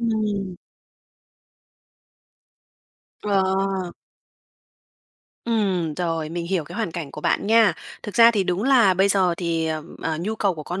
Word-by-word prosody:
Ừm. 210 Hz, -5 st, -2 dB, 2.7 s
Ờ. 200 Hz, -2 st, +2 dB, 2.0 s
Ừm, 195 Hz, -9 st, 0 dB
rồi, 165 Hz, -2 st, -2 dB
mình 170 Hz, +1 st, -4 dB
hiểu 180 Hz, -3 st, -1 dB
cái 150 Hz, -, -10 dB
hoàn 220 Hz, -7 st, -2 dB
cảnh 160 Hz, -4 st, -6 dB
của 150 Hz, -, -9 dB
bạn -, -, 0 dB
nha. 225 Hz, -3 st, +5 dB, 0.3 s
Thực 210 Hz, -, -7 dB
ra 230 Hz, -1 st, +7 dB
thì 205 Hz, -4 st, 0 dB
đúng 180 Hz, +3 st, -1 dB
là 240 Hz, -8 st, +4 dB
bây 190 Hz, +2 st, +3 dB
giờ 185 Hz, -3 st, +2 dB
thì, 165 Hz, -2 st, -1 dB
ờ, 155 Hz, -1 st, -3 dB, 0.2 s
ờ, 160 Hz, -1 st, -2 dB
nhu 215 Hz, +5 st, -2 dB
cầu 200 Hz, -4 st, 0 dB
của 155 Hz, -, -7 dB
con 175 Hz, +5 st, -5 dB
190 Hz, 145 wpm, -23 LUFS, 170-210 Hz, 2.7 s, ra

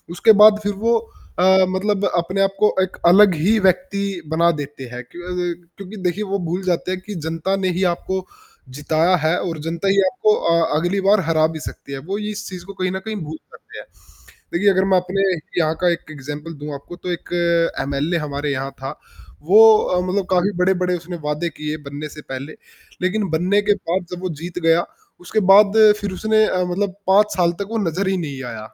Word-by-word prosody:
उसके 220 Hz, -, +5 dB
बाद 210 Hz, 0 st, +7 dB
फ़िर 205 Hz, 0 st, -1 dB
वो 235 Hz, 0 st, +4 dB, 0.4 s
अ, -, -, +3 dB, 0.3 s
मतलब 200 Hz, +1 st, 0 dB
अपने 185 Hz, +3 st, -1 dB
आपको 195 Hz, +2 st, +2 dB
एक 190 Hz, 0 st, -2 dB
अलग 190 Hz, +2 st, +7 dB
ही 195 Hz, +9 st, +2 dB
व्यक्ति 190 Hz, 0 st, 0 dB
बना 170 Hz, +1 st, +3 dB
देते 145 Hz, -1 st, -7 dB
हैं। 125 Hz, 0 st, -7 dB
क्यों 175 Hz, -, -10 dB
अ, 180 Hz, -1 st, -2 dB, 0.2 s
क्योंकि 200 Hz, +2 st, -9 dB
देखिए 195 Hz, +4 st, -2 dB
वो 200 Hz, -1 st, -2 dB
भूल 180 Hz, +3 st, -2 dB
जाते 180 Hz, 0 st, -1 dB
हैं 185 Hz, -, -2 dB
कि 210 Hz, -, -6 dB
जनता 165 Hz, +4 st, -1 dB
ने 185 Hz, -, +2 dB
ही 190 Hz, -, 0 dB
आपको 190 Hz, +2 st, -4 dB, 0.5 s
जिताया 160 Hz, +5 st, +2 dB
है 160 Hz, +2 st, +2 dB
और 170 Hz, -3 st, -4 dB
जनता 165 Hz, +4 st, -3 dB
ही 195 Hz, 0 st, +2 dB
आपको 215 Hz, -4 st, +2 dB
अ, 170 Hz, -2 st, +1 dB
अगली 175 Hz, +5 st, 0 dB
बार 205 Hz, +1 st, +5 dB
हरा 155 Hz, -1 st, +3 dB
भी -, -, -5 dB
सकती 140 Hz, -, -9 dB
है। -, -, -4 dB
वो 200 Hz, -, 0 dB
इस 210 Hz, -, -7 dB
चीज़ 180 Hz, -2 st, -8 dB
को 200 Hz, -, -9 dB
कहीं 185 Hz, -1 st, -2 dB
न 190 Hz, -, -3 dB
कहीं 220 Hz, 0 st, -4 dB
भूल 155 Hz, +1 st, -6 dB
जाते -, -, -16 dB
हैं, -, -, -10 dB, 0.7 s
देखिए 200 Hz, +4 st, +3 dB
अगर 190 Hz, 0 st, +2 dB
मैं -, -, +6 dB
अपने 185 Hz, +2 st, -1 dB, 0.4 s
यहाँ 160 Hz, -2 st, +1 dB
का 180 Hz, -, +3 dB
एक 165 Hz, -2 st, -5 dB
एग्ज़ाम्पल 145 Hz, +3 st, -7 dB
दूँ 150 Hz, 0 st, -5 dB
आपको 140 Hz, +5 st, -9 dB
तो 180 Hz, 0 st, -6 dB
एक 175 Hz, -, -6 dB, 0.5 s
एमएलए 140 Hz, +5 st, -1 dB
हमारे 145 Hz, +1 st, -3 dB
यहाँ 135 Hz, 0 st, -3 dB
था। 135 Hz, -, -6 dB, 0.4 s
वो 190 Hz, +7 st, +5 dB, 0.2 s
अ, 180 Hz, -3 st, 0 dB
मतलब 185 Hz, +2 st, -1 dB
काफ़ी 185 Hz, +2 st, +2 dB
बड़े-बड़े 180 Hz, -1 st, +1 dB
उसने 175 Hz, +1 st, -8 dB
वादे 150 Hz, +3 st, -1 dB
किए 150 Hz, 0 st, -3 dB
बनने 145 Hz, +2 st, -6 dB
से 150 Hz, -, -9 dB
पहले। 135 Hz, +4 st, -6 dB, 0.5 s
लेक़िन 195 Hz, +1 st, -1 dB
बनने 180 Hz, +6 st, +1 dB
के -, -, +7 dB, 0.2 s
बाद 180 Hz, +1 st, 0 dB
जब 180 Hz, -, -6 dB
वो 185 Hz, -, -2 dB
जीत 175 Hz, +1 st, -5 dB
गया, 165 Hz, +1 st, +3 dB, 0.3 s
उसके 180 Hz, +5 st, -1 dB
बाद 205 Hz, +1 st, +6 dB, 0.2 s
फ़िर 200 Hz, -2 st, -3 dB
उसने 215 Hz, +3 st, +2 dB
अ, 180 Hz, 0 st, 0 dB
मतलब 185 Hz, +2 st, -2 dB
5 205 Hz, +2 st, +4 dB
साल 175 Hz, -2 st, +3 dB
तक 200 Hz, -, -3 dB
वो 230 Hz, -, -1 dB
नज़र 185 Hz, +5 st, -2 dB
ही 190 Hz, 0 st, +1 dB
नहीं 140 Hz, -6 st, -5 dB
आया। 110 Hz, 0 st, -10 dB
180 Hz, 210 wpm, -20 LUFS, 160-195 Hz, 0.7 s, बाद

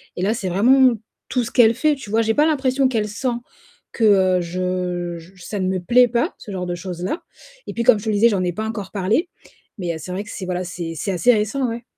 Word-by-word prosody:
et -, -, -4 dB
là, 200 Hz, +4 st, +1 dB
c'est 205 Hz, -5 st, -3 dB
vraiment 250 Hz, +7 st, +5 dB, 0.4 s
tout 250 Hz, -, 0 dB
ce 235 Hz, -, -6 dB
qu'elle 230 Hz, -2 st, +5 dB
fait, 300 Hz, +4 st, +2 dB
tu 265 Hz, -7 st, -10 dB
vois? 225 Hz, +2 st, +2 dB
J'ai 225 Hz, 0 st, +1 dB
pas 295 Hz, +6 st, +3 dB
l'impression 270 Hz, -3 st, +2 dB
qu'elle 225 Hz, -5 st, -1 dB
sent, 220 Hz, +5 st, -4 dB, 0.6 s
que 190 Hz, -5 st, +3 dB
je 180 Hz, 0 st, -3 dB
je 165 Hz, +2 st, -15 dB
ça 205 Hz, -, -4 dB
ne 185 Hz, -, 0 dB
me 185 Hz, 0 st, 0 dB
plaît 245 Hz, +8 st, +4 dB
pas, 240 Hz, +8 st, 0 dB
ce 210 Hz, -, -10 dB
genre 185 Hz, -2 st, -3 dB
de 175 Hz, -, -2 dB
choses-là 180 Hz, -, -5 dB, 0.4 s
et -, -, -5 dB
puis 235 Hz, -, -1 dB
comme 235 Hz, -2 st, +6 dB
je -, -, -10 dB
te -, -, -1 dB
le 215 Hz, -, +1 dB
disais, 225 Hz, +3 st, +5 dB
j'en 195 Hz, -4 st, 0 dB
ai 175 Hz, -1 st, -1 dB
pas 215 Hz, +4 st, -4 dB
encore 210 Hz, -4 st, -5 dB
parlé, 210 Hz, -, 0 dB, 0.5 s
mais 180 Hz, -4 st, -2 dB
heu, -, -, -5 dB
c'est 180 Hz, -, -8 dB
vrai 190 Hz, +3 st, -3 dB
que 210 Hz, -, -13 dB
c'est, 190 Hz, -, -6 dB
voilà, 180 Hz, 0 st, -2 dB
c'est 175 Hz, -2 st, -5 dB
c'est 195 Hz, -, -3 dB
assez 190 Hz, +7 st, +4 dB
récent 220 Hz, +5 st, 0 dB
ouais. 230 Hz, +1 st, -5 dB
205 Hz, 255 wpm, -21 LUFS, 180-240 Hz, 0.6 s, comme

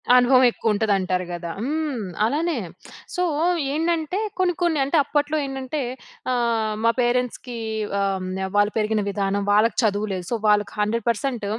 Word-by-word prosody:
అనుభవం 250 Hz, +1 st, +6 dB
ఎక్కువ 225 Hz, -2 st, 0 dB
ఉంటది, 210 Hz, 0 st, +1 dB
అంటారు 185 Hz, -1 st, -1 dB
కదా! 170 Hz, -1 st, -5 dB
హ్మ్. 290 Hz, -3 st, -2 dB, 0.2 s
అలానే. 315 Hz, +8 st, 0 dB, 0.6 s
సో, 360 Hz, -, +1 dB, 0.5 s
ఏంటంటే 330 Hz, +3 st, 0 dB, 0.2 s
కొన్ని, 365 Hz, -1 st, +3 dB
కొన్ని 335 Hz, -4 st, +2 dB
అంటే, 280 Hz, +4 st, +1 dB
అప్పట్లో 295 Hz, +2 st, 0 dB
ఏంటంటే? 270 Hz, +2 st, -4 dB, 0.5 s
ఆహ్, 230 Hz, -3 st, 0 dB
మా 230 Hz, -, +5 dB
పేరెంట్స్‌కి 245 Hz, 0 st, -1 dB, 0.4 s
ఆహ్, 195 Hz, -2 st, -1 dB, 0.3 s
వాళ్ళు 205 Hz, 0 st, +4 dB
పెరిగిన 215 Hz, 0 st, +1 dB
విధానం 200 Hz, 0 st, -1 dB
వాళ్ళకి 215 Hz, +3 st, +3 dB
చదువు 210 Hz, 0 st, +1 dB
లేదు. 180 Hz, -1 st, -4 dB
సో, 235 Hz, -, +1 dB
వాళ్ళకి 205 Hz, -1 st, +3 dB
100% 230 Hz, +2 st, -1 dB
235 Hz, 140 wpm, -23 LUFS, 210-280 Hz, 0.6 s, అనుభవం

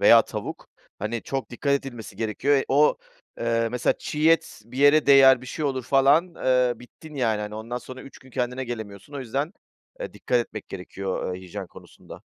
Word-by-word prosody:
veya -, -, +8 dB
tavuk, -, -, -6 dB, 0.3 s
hani, 110 Hz, +2 st, -3 dB
çok 135 Hz, -1 st, -4 dB
dikkat 140 Hz, +4 st, -1 dB
edilmesi 125 Hz, -7 st, -4 dB
gerekiyor. 115 Hz, +6 st, +1 dB
E 135 Hz, -, +1 dB
o, 145 Hz, +3 st, +4 dB, 0.4 s
eee, 115 Hz, -1 st, +1 dB
mesela 125 Hz, +1 st, +1 dB
çiğ 155 Hz, +2 st, +1 dB
et 165 Hz, -9 st, +1 dB
bir 120 Hz, +3 st, -9 dB
yere 145 Hz, +2 st, +5 dB
değer, 135 Hz, -2 st, +8 dB
bir 130 Hz, -, -11 dB
şey 155 Hz, +4 st, -4 dB
olur 130 Hz, -2 st, -1 dB
falan, 140 Hz, +7 st, +4 dB
eee, 125 Hz, -3 st, +2 dB
bittin 150 Hz, +6 st, -14 dB
yani. 115 Hz, -6 st, +1 dB
Hani, 105 Hz, 0 st, -5 dB
ondan 115 Hz, +3 st, -4 dB
sonra 130 Hz, +1 st, -10 dB
3 140 Hz, -, -13 dB
gün 130 Hz, -, -18 dB
kendine 125 Hz, +1 st, -2 dB
gelemiyorsun. 110 Hz, 0 st, -7 dB
O -, -, -4 dB
yüzden, 135 Hz, -, -2 dB, 0.5 s
eee, -, -, -5 dB
dikkat 125 Hz, -, 0 dB
etmek 110 Hz, -3 st, -5 dB
gerekiyor, 95 Hz, 0 st, -4 dB
eee, 90 Hz, -, -7 dB
hijyen 95 Hz, +1 st, -7 dB
konusunda. -, -, -14 dB
125 Hz, 190 wpm, -25 LUFS, 110-140 Hz, 0.5 s, veya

